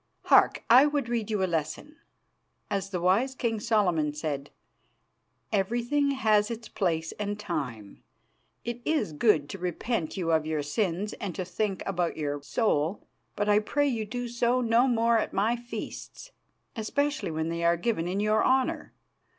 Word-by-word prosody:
Hark! - - +4
I 255 +5 +7
would 290 -5 -1
read 230 -3 -1
you 210 -3 0
a - - +4
lesson. 170 - -3 0.7
As 195 -1 -1
the 185 -2 -2
wise 205 +10 +2
King 225 -3 -1
Solomon 180 -10 +1
said, 145 -2 -4 1.0
'Everything 240 +8 +1
has 215 -6 +2
its 230 -1 -6
place 165 -5 -1
and 205 0 -3
time.' 125 - -5 0.6
It 240 +1 -4
is 290 - 0
good 155 -4 +3
to 195 - -6
repent 180 +1 -2
you 170 -3 0
of 160 -1 +3
your 155 -2 -1
sins 185 +5 -1
and 190 -4 -5
to 185 - -3
think 195 +1 -2
about 180 -3 -1
your 145 -2 -2
soul, 165 -1 0 0.3
but 205 0 -1
I 210 0 +5
pray 290 +7 0
you 225 -5 -2
do 245 +3 -4
so 240 +1 +1
no 235 +1 +3
more 230 -1 +3
at - - -3
my 215 +5 +2
feasts, 240 - -8 0.4
especially 285 - -1
when 160 0 -2
they 170 0 -3
are 170 0 +3
given 175 -3 -1
in 185 +3 -1
your 215 +1 +2
honour. 260 0 +1
210 Hz, 165 wpm, -28 LUFS, 170-235 Hz, 1.0 s, I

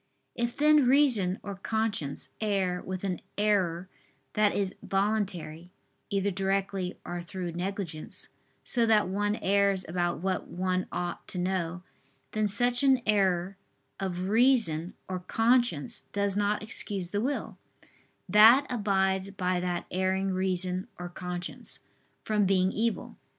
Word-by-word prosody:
If 235 0 -2
then 300 -2 +5
reason 245 -9 +4
or 200 - -5
conscience 200 -8 -2
err 195 -4 0
with 185 0 -5
an 185 -3 -2 0.2
error 190 -4 +1 0.5
that 210 -1 +3
is 195 -2 0
voluntary, 190 -5 -2 0.4
either 200 0 0
directly, 195 -1 -1
or 175 0 -4
through 175 0 -5
negligence, 175 -2 -4 0.3
so 235 -2 +3
that 215 -3 +4
one 205 +2 0
errs 200 -1 +2
about 175 +1 -1
what 185 +3 -2
one 185 0 -1
ought 175 -1 -4
to - - -4
know; 180 -1 -2 0.5
then 215 -1 +1
such 245 +5 +1
an 265 -3 +4
error 195 -2 +1 0.4
of 185 -1 -3
reason 220 -8 +3
or 185 -1 -3
conscience 225 - +1
does 200 -1 0
not 205 +1 0
excuse 200 -4 -3
the 205 - 0
will, 275 +4 -3 0.7
that 225 +7 +7
abides 190 -4 +1
by 185 -2 -1
that 175 -1 -2
erring 190 +1 0
reason 185 +1 0
or 175 0 -6
conscience, 180 0 -4 0.4
from 210 -2 +1
being 185 -1 +3
evil. 230 +2 -2
195 Hz, 130 wpm, -29 LUFS, 180-210 Hz, 0.7 s, that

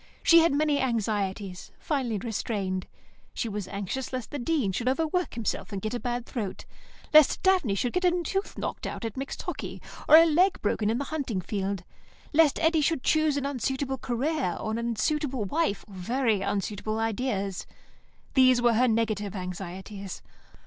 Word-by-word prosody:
She 335 - +8
had 330 +1 +4
many 290 0 +2
anxieties, 205 -6 -2
finely 260 -8 -1
restrained. 200 -4 -3 0.5
She 235 - -2
was 205 -3 -4
anxious 200 +7 -4
lest 255 -3 -5
the 290 - -4
Dean 260 -6 0
should 235 +7 0
overwork 325 +5 0
himself 230 -1 -3
and 200 - -3
get 215 +4 -3
a 245 - -2
bad 245 -1 -3
throat; 210 -6 -5 0.5
lest 305 -2 +6
Daphne 365 - +3
should 240 +4 -1
get 360 - 0
a 355 -1 +2
tooth 390 +5 -3
knocked - - -4
out - - -5
at 225 - -4
mixed 270 +2 -5
hockey, - - -5 0.3
or 305 - +10
a 330 - +8
leg 350 +4 +3
broken 210 0 +1
in 225 - +1
the 280 - -1
hunting 260 -10 -2
field; 195 0 -3 0.5
lest 305 -2 +5
Eddy 320 -1 +3
should 295 -2 +1
choose 310 -2 +2
an 280 - -1
unsuitable 265 0 -2
career 260 - -1
or 220 - -3
an 225 - -1
unsuitable 240 +2 -1
wife, 290 - -1
or 205 - -14
very 220 +3 0
unsuitable 205 +2 -2
ideas. 215 -4 -2 0.7
These 255 -2 +6
were 240 -1 +4
her 250 +3 +4
negative 215 -3 0
anxieties. 190 +1 -6
240 Hz, 170 wpm, -27 LUFS, 205-285 Hz, 0.7 s, or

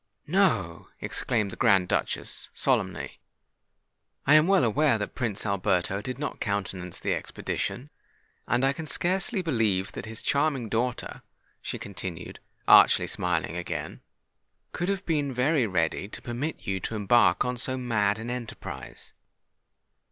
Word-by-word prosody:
"No!" 150 - +1
exclaimed 105 -5 -1
the - - -7
Grand 100 -6 +4
Duchess, - - -2
solemnly: - - 0 1.1
"I 145 - +5
am 155 +3 +6
aware 140 - +4
that 105 - -4
Prince 110 -5 -2
Alberto 100 -1 0
did 130 +4 -5
not 145 +1 -4
countenance 95 -3 -3
the - - 0
expedition; 140 +5 -4 0.6
and 120 +3 +2
I 135 - +3
can 160 +2 -7
scarcely 190 +6 0
believe 110 - +1
that - - -7
his 110 0 -6
charming 140 -5 +1
daughter," 120 +2 -2 0.4
she - - -4
continued, 95 -4 -7 0.3
archly - - +7
smiling 90 -2 -1
again, 90 0 -5 0.7
"could 175 +2 -2
have 195 -1 -2
been 145 -5 0
very 130 0 +2
ready 90 0 0
to - - -6
permit 125 +7 -4
you 95 0 -1
to 110 - -4
embark 110 +5 +4
on 125 0 -1
so 130 +2 -1
mad 110 -5 +1
an 115 +2 -5
enterprise. 125 -2 -7
120 Hz, 135 wpm, -27 LUFS, 100-145 Hz, 1.1 s, archly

